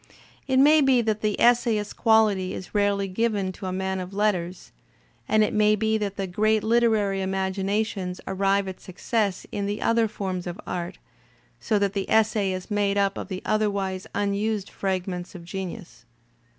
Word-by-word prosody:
It 260 -1 +2
may 300 +3 +6
be 260 -3 +4
that 215 -1 -1
the 210 -2 -1
essayist's 235 -3 +3
quality 215 -5 +2
is 185 - -9
rarely 200 -1 +1
given 200 -1 -1
to 190 +1 -7
a - - -2
man 190 0 -2
of 185 +1 -7
letters; 185 -4 -1 0.6
and 215 0 +4
it 210 - 0
may 210 0 +4
be 220 +1 0
that 200 -2 -3
the 195 - -1
great 215 +4 +1
literary 220 -4 +2
imaginations 190 0 -2
arrive 195 +1 +1
at 190 - -7
success 200 +1 -2
in 200 -1 -2
the 205 +1 -3
other 230 -1 +2
forms 190 -4 -4
of 175 +3 -6
art, 175 0 -4 0.6
so 220 - 0
that 200 -1 0
the 195 -2 -3
essay 215 -3 +2
is 185 +3 -6
made 205 -1 +1
up 200 -1 +2
of - - -6
the 185 -2 -6
otherwise 200 -3 -1
unused 205 0 -1
fragments 185 -1 -3
of 170 -1 -9
genius. 190 - -7
200 Hz, 170 wpm, -25 LUFS, 190-215 Hz, 0.6 s, may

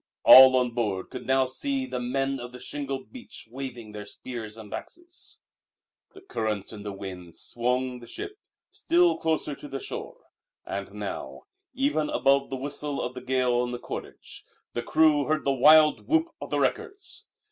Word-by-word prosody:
All 130 0 +10
on 125 -1 +2
board 105 -6 -2
could - - -7
now 130 0 +3
see 265 - -2
the 255 - -4
Men 135 +2 -1
of 120 0 -8
the 125 - -9
Shingle 140 -1 -4
Beach 250 - -11
waving 125 -4 -7
their 105 -1 -8
spears 115 -3 -7
and 110 -2 -10
axes. 345 0 -9 0.8
The 390 - -12
current 110 - -3
and 105 -2 -9
the 105 - -4
wind 95 -3 -8
swung 125 +1 -1
the 120 - -13
ship 415 - -7 0.3
still 345 +1 +3
closer 160 -2 -1
to 295 - -10
the - - -5
shore, 405 - -7 0.5
and - - -5
now - - -6 0.3
even 265 - +1
above 135 0 +2
the 135 - -3
whistle 145 +1 -4
of 125 - -3
the 125 - -7
gale 125 -1 +1
in 125 - -3
the 120 - -4
cordage - - -8 0.3
the 120 - -2
crew 150 +2 +3
heard 155 -1 0
the 140 - +3
wild 150 +3 +6
whoop 320 +2 +2
of - - -6
the - - 0
wreckers. 420 -2 -3
130 Hz, 175 wpm, -27 LUFS, 120-155 Hz, 0.8 s, All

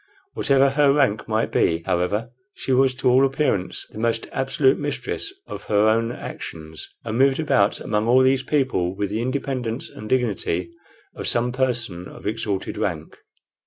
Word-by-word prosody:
Whatever 135 0 +3
her 145 0 +4
rank 135 -7 +1
might 110 0 0
be, 85 0 +1
however, 100 +7 -1 0.2
she 135 - -4
was 130 0 +3
to 125 - -1
all 125 +2 +5
appearance 135 -9 0
the - - -9
most 115 0 0
absolute 135 0 +2
mistress 145 - -3
of - - -8
her 105 +1 +3
own 115 +1 +2
actions, 80 -8 -8
and 115 +1 -3
moved 135 +1 +4
about 105 -10 +2
among 105 +1 -1
all 125 +2 +5
these 130 0 +3
people 130 -11 0
with 100 0 -2
the 110 +2 -1
independence 130 -2 -3
and 105 0 -9
dignity 125 - 0 0.4
of - - -5
some 120 +1 +2
person 120 -9 -1
of - - -12
exalted 105 -2 -2
rank. - - -3
120 Hz, 160 wpm, -23 LUFS, 105-135 Hz, 0.4 s, all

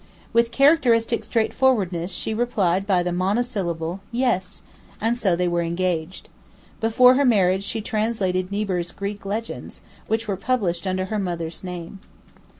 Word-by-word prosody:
With 235 0 +3
characteristic 240 -6 +3
straightforwardness 220 -6 +1
she 200 +4 -3
replied 200 -5 0
by 185 -3 +3
the 180 - -1
monosyllable, 185 -3 -1
'Yes,' 235 -6 -1 0.4
and 225 +2 +1
so 200 -7 +1
they 180 +1 0
were 175 0 +1
engaged. 170 0 -2 0.5
Before 250 +3 +6
her 280 +2 +3
marriage 195 -6 +3
she 220 +2 -3
translated 210 -5 -1
Niebuhr's 190 -4 -2
'Greek 200 0 -5
Legends,' 220 +3 -5 0.3
which 225 +1 -1
were 195 -2 -1
published 195 -5 -1
under 185 0 -1
her 215 - 0
mother's 170 -3 -4
name. 180 +1 -7
200 Hz, 140 wpm, -23 LUFS, 180-230 Hz, 0.5 s, Before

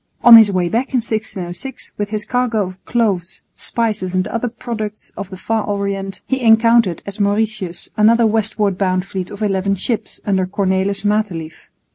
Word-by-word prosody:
On 240 -1 +10
his 220 -3 +8
way 180 -2 +1
back 240 +9 -1
in - - +4
1606 215 0 -4
with 205 0 -3
his 215 -1 -2
cargo 245 -4 0
of 185 0 -9
cloves, 200 -7 -1
spices 210 -6 -2
and 185 0 +1
other 230 +2 -2
products 220 -3 -5
of 200 -2 -6
the 190 - -8
far 220 +3 -1
Orient, 195 -2 -3
he 265 0 -1
encountered 225 -4 +4
at 200 +1 -7
Mauritius 205 -3 -1
another 230 +2 +4
westward 215 -3 0
bound 185 -1 +1
fleet 190 -2 -5
of 205 +1 -6
eleven 195 -1 0
ships 225 +4 -3
under 190 -2 +1
Cornelis 195 0 0
Matelief. 205 -7 -2
205 Hz, 165 wpm, -18 LUFS, 190-225 Hz, -, On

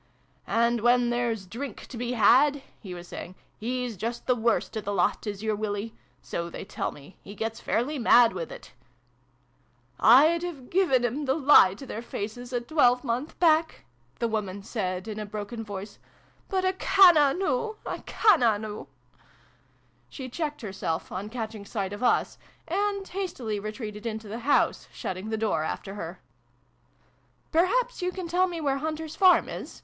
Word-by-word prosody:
and 235 +3 +2
when 240 +1 +3
there's 235 -4 -1
drink 235 +5 -7
to - - -11
be 240 +1 -3
had," 275 +6 +4 0.2
he 185 -4 -8
was 175 0 -10
saying, 180 +1 -8
" - - -39
he's 245 0 -3
just 230 +5 -4
the 250 - +3
worst 230 0 0
o' 220 - -2
the 205 0 -4
lot, 205 - 0
is 205 0 -5
your 220 -1 0
Willie. 210 +1 -3 0.3
So 170 0 -4
they - - -7
tell - - -3
me. 145 +6 -15
He 200 - -11
gets 225 +2 -3
fairly 270 +6 -1
mad 235 -2 +6
wi' 180 - -4
it! - - -11 0.7
" 120 -1 -39 0.2
"I'd 330 +3 +4
have 315 -8 -7
given 305 -10 +3
'em 275 +5 -2
the 265 0 +1
lie 280 -10 +6
to 270 - -10
their 225 -3 -6
faces, 235 +2 -6
a 245 - 0
twelvemonth 250 -1 +1
back! 320 -1 +2 0.2
" 120 +1 -38
the 235 - 0
woman 200 -3 -3
said 185 -3 -3
in 215 -1 -5
a 210 - -4
broken 215 +2 -5
voice. 205 -1 -8 0.3
" - - -34
But 375 -1 0
a' 375 - +2
canna 355 -7 +6
noo! 440 +4 -1
A' - - -4
canna 250 - +3
noo! 210 0 -7 0.6
" - - -37
She 260 -2 -7
checked 300 +2 -4
herself, 190 -6 -4
on 195 +3 -5
catching 220 -3 -5
sight 200 -1 -4
of 205 - -7
us, 250 - +1 0.3
and 395 +2 -1
hastily 280 - -4
retreated 215 +1 -6
into 220 -1 -5
the 220 +3 -5
house, 280 +4 +1
shutting 185 +3 -5
the 220 - -1
door 220 -7 0
after 190 +5 -4
her. 180 -3 -7 0.7
" - - -39
Perhaps 470 +9 +2
you 360 0 0
can 365 -2 -6
tell 360 +2 +2
me 345 -2 -5
where 275 -3 0
Hunter's 315 +1 -4
farm 370 -2 +5
is - - -8
235 Hz, 180 wpm, -27 LUFS, 205-300 Hz, 0.7 s, mad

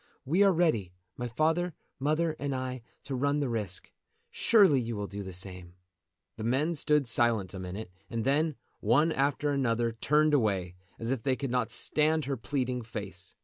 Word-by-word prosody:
We 165 +9 +2
are 200 -1 +7
ready, 155 - +1 0.2
my 120 - -3
father, 160 +7 +1 0.2
mother, 155 +3 +1
and 140 -2 -2
I, 130 -1 -4 0.2
to 140 - -5
run 140 +3 +1
the 140 -3 0
risk; 105 -6 -3 0.4
surely 195 - +5
you 115 -1 -3
will 105 0 -3
do 100 0 -6
the 95 -1 -6
same." 90 -1 -7 0.6
The 110 - -5
men 135 +8 +1
stood 150 -2 +2
silent 115 -5 +2
a 95 - -6
minute, 95 +2 -6 0.2
and 115 -1 -2
then, 150 +3 +2 0.2
one 135 +10 +3
after 145 +1 +1
another, 120 -4 +1
turned 150 +6 +2
away, 100 -9 +1 0.2
as 115 +2 -2
if 135 -4 -1
they 130 +3 +1
could 135 -1 -4
not 125 -2 +1
stand 155 +5 +1
her 135 0 -1
pleading 125 0 -2
face. 100 -5 -7
125 Hz, 180 wpm, -30 LUFS, 110-150 Hz, 0.6 s, are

